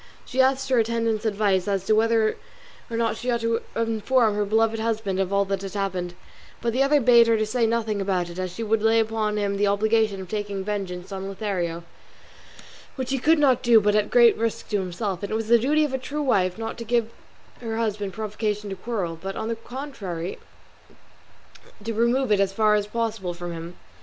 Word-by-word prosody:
She 260 +1 +1
asked 265 0 +2
her 255 -2 +3
attendant's 230 -1 0
advice 200 -3 +1
as 195 -2 -1
to 215 - +3
whether 225 0 +3 0.5
or 230 - -3
not 230 -1 0
she 250 - -4
ought 235 -1 +1
to 230 0 0
inform 230 0 +2
her 205 0 0
beloved 225 +2 +1
husband 220 -4 -1
of 195 0 0
all 200 0 +2
that 195 -1 -2
had 195 0 -7
happened, 185 -3 -2 0.4
but 235 -1 -1
the 260 - +1
other 285 +2 +4
bade 235 -2 +6
her 220 -1 +2
say 230 +1 +1
nothing 220 -3 -1
about 185 -3 0
it, 175 +1 -8
as 185 -1 -3
she 225 - -5
would 220 0 +1
lay 225 +1 +4
upon 220 -1 0
him 200 -1 -1
the 205 0 +2
obligation 215 0 +2
of 190 - -7
taking 205 -1 -3
vengeance 190 -2 -4
on 195 0 -5
Lothario, 185 -4 -3 1.1
which 260 -1 -4
he 270 - 0
could 320 +6 +4
not 270 -5 +3
do 235 -2 +6
but 210 0 +2
at 210 0 +2
great 240 -1 +6
risk 230 -1 -2
to 205 - +1
himself; 185 +1 -3
and 200 - -5
it - - 0
was 220 0 -3
the 235 0 +6
duty 300 +6 +2
of 280 - -5
a 265 - -1
true 295 +3 -4
wife 185 -8 +1
not 225 +1 -5
to - - -4
give 230 0 0 0.5
her 225 -2 -4
husband 210 -3 -2
provocation 210 0 -3
to - - -3
quarrel, 185 -6 -4
but, 195 0 -5
on 220 - -3
the 230 - -1
contrary, 225 - -6 1.4
to 225 +1 -3
remove 235 +2 +1
it 205 - +4
as 195 -1 +2
far 215 +1 +3
as 205 -1 +1
possible 215 -5 -3
from 175 0 -6
him. 170 +1 -8
215 Hz, 210 wpm, -24 LUFS, 195-230 Hz, 1.4 s, bade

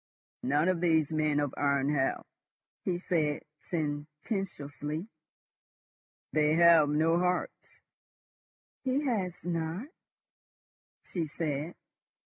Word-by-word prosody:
"None 145 +5 +2
of 185 -2 +1
these 160 -3 +3
men 155 -2 +2
of 145 -2 -1
iron 140 0 +2
have," 135 -2 +1 0.6
he 180 -2 +1
said 160 -5 0 0.3
sententiously. 150 +1 -3 1.3
"They 155 0 +3
have 170 -3 +7
no 160 +3 +3
hearts." 180 0 -2 1.1
"He 270 +3 +1
has 190 -10 -1
not," 170 - -2 1.1
she 170 -4 -3
said. 150 +1 -3
160 Hz, 90 wpm, -30 LUFS, 150-175 Hz, 1.3 s, have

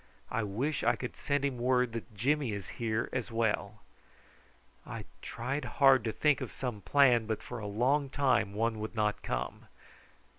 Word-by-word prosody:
"I - - 0
wish 120 +9 -2
I - - +4
could 120 - -6
send 145 -1 0
him 130 -3 -2
word 125 0 +2
that 115 -1 -6
Jimmy 135 +2 +1
is 100 -3 -6
here 115 +1 0
as 130 -2 -2
well." 110 -2 -1 1.0
I - - -7 0.2
tried 130 +5 -3
hard 135 -3 +6
to 110 - 0
think 150 +3 +2
of - - -4
some 120 -6 -4
plan, 125 -3 +4
but 110 -1 -2
for 125 - -6
a 105 - -5
long 130 +7 +1
time 130 -6 +2
not 100 - -9
one 115 0 0
would 110 +1 -4 0.3
come. 60 +1 -4
120 Hz, 175 wpm, -31 LUFS, 110-135 Hz, 1.0 s, hard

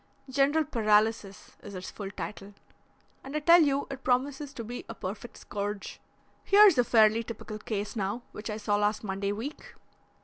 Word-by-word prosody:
General 285 +4 +2
paralysis 215 -5 0
is 200 -1 -9
its 185 0 -7
full 200 -2 -6
title, 200 0 -8 0.7
and 270 +2 -8
I - - +1
tell 335 +3 +7
you 285 -2 +2
it 270 -1 -7
promises 270 +3 0
to 230 - -5
be 240 +3 -6
a 230 - -6
perfect 210 +5 -7
scourge. 205 0 -5 0.4
Here's 400 -7 +6
a - - +6
fairly 225 -1 +4
typical 220 -1 -7
case 210 0 -4
now 205 +3 -2
which 210 - -7
I 210 - -3
saw 205 -1 0
last 210 +1 0
Monday 200 0 -2
week. 230 +9 -7
220 Hz, 170 wpm, -28 LUFS, 205-270 Hz, 0.7 s, tell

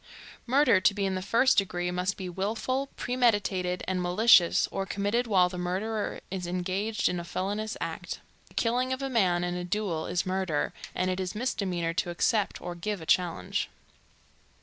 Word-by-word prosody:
Murder 260 -6 +4
to 200 - +4
be 200 -1 0
in 190 - 0
the 185 - -2
first 230 +7 +4
degree 180 -2 -2
must 180 +2 -1
be 185 - -5
willful, 225 +9 -2
premeditated 205 -7 +1
and 185 -1 0
malicious, 180 0 +5
or 195 - -2
committed 205 +5 -1
while 185 -4 +4
the 180 0 -6
murderer 205 +5 -2
is 185 -2 -3
engaged 185 +4 -1
in 180 - -1
a - - -5
felonious 205 +5 -3
act. - - -4 0.3
The - - -22
killing 250 +2 +1
of 260 +1 -4
a 270 - -2
man 180 -7 +2
in 175 0 -1
a 180 0 -3
duel 180 -3 -2
is 175 +1 0
murder, 185 -5 -1 0.2
and 185 0 +1
it 185 - -2
is 185 +1 -3
a - - -4
misdemeanor 185 -8 -1
to 175 0 -1
accept 205 +4 +1
or 175 - -5
give 195 +4 -3
a 160 - -9
challenge. 165 - 0
190 Hz, 185 wpm, -28 LUFS, 180-215 Hz, 0.3 s, malicious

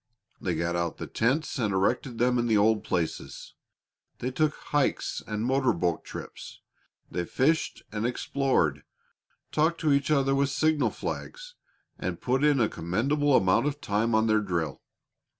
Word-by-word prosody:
They 90 -4 -1
got 85 +2 -1
out 85 -1 -2
the - - -5
tents 135 +6 0
and 110 -4 +1
erected 115 +6 0
them 125 +1 +2
in 120 - 0
the 110 -2 +3
old 105 +1 +3
places. 85 -3 -3 0.6
They 125 - -3
took 150 +3 +1
hikes 145 -2 -1
and 110 +1 -2
motor 130 +1 +2
boat 85 -1 -1
trips; - - -9 0.5
they 90 - -1
fished 150 - 0
and 105 0 -3
explored, 120 - 0 0.7
talked 160 +2 +1
to 155 -3 +3
each 140 0 +1
other 135 -2 +3
with 140 0 +2
signal 155 +1 +2
flags, - - -6 0.5
and - - -3
put 130 +2 0
in 145 -2 +4
a 115 - +4
commendable 135 - +1
amount 95 +9 +3
of 145 0 -3
time 110 +1 0
on 110 0 +3
their 110 -1 +3
drill. 85 -8 -2
120 Hz, 160 wpm, -27 LUFS, 100-140 Hz, 0.7 s, in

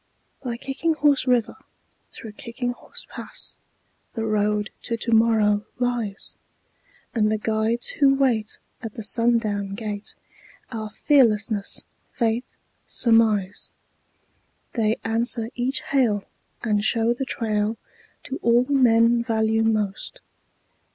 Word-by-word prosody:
By 240 -3 -4
Kicking 275 +6 -1
Horse 285 -3 +3
River, 245 -3 +2 0.6
through 220 - -9
Kicking 245 +1 -4
Horse 245 - -10
Pass, - - -5 0.6
The 225 - -2
Road 210 -1 0
to 230 -1 -2
Tomorrow 220 -3 +3
lies; 240 -5 -2 0.8
And 215 -2 +2
the 215 - +1
guides 220 +2 0
who 275 -1 +4
wait 240 -6 +1 0.2
at 225 -3 -7
the 225 - -6
sundown 215 -3 +1
gate 210 -1 -5 0.6
Are 220 -2 -4
Fearlessness, 220 -5 +2 0.3
Faith, 235 0 0 0.4
Surmise. 220 -5 +2 1.0
They 220 -1 +1
answer 230 +1 0
each 255 +4 0
hail 230 -8 +1 0.4
and 210 -3 +1
show 230 +1 +3
the 245 - -3
trail 220 -3 -1 0.5
To 265 - -5
all 235 +1 +4
men 235 -3 +4
value 220 -1 +1
most. 215 - -1
225 Hz, 110 wpm, -24 LUFS, 215-245 Hz, 1.0 s, who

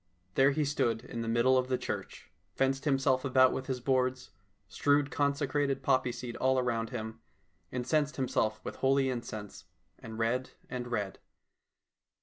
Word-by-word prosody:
There 135 +5 +5
he 150 +1 +1
stood 120 -5 0
in 115 - -5
the 115 - -4
middle 120 +3 +4
of 130 - -1
the 130 -1 +1
church, - - -6 0.2
fenced 135 +1 +1
himself 135 -2 +2
about 130 -1 +5
with 130 - -4
his 130 -2 -2
boards, 130 0 0 0.4
strewed 145 0 +2
consecrated 140 -1 0
poppy 130 -1 +2
seed 120 0 -6
around 125 -3 +1
him, 110 -3 -5 0.5
incensed 145 +4 0
himself 110 -5 0
with - - -6
holy 135 0 +2
incense, 110 -4 -6 0.3
and 110 -1 -8
read 120 +3 0 0.2
and 125 -1 -4
read. 105 -5 -3
130 Hz, 145 wpm, -31 LUFS, 120-135 Hz, 0.5 s, There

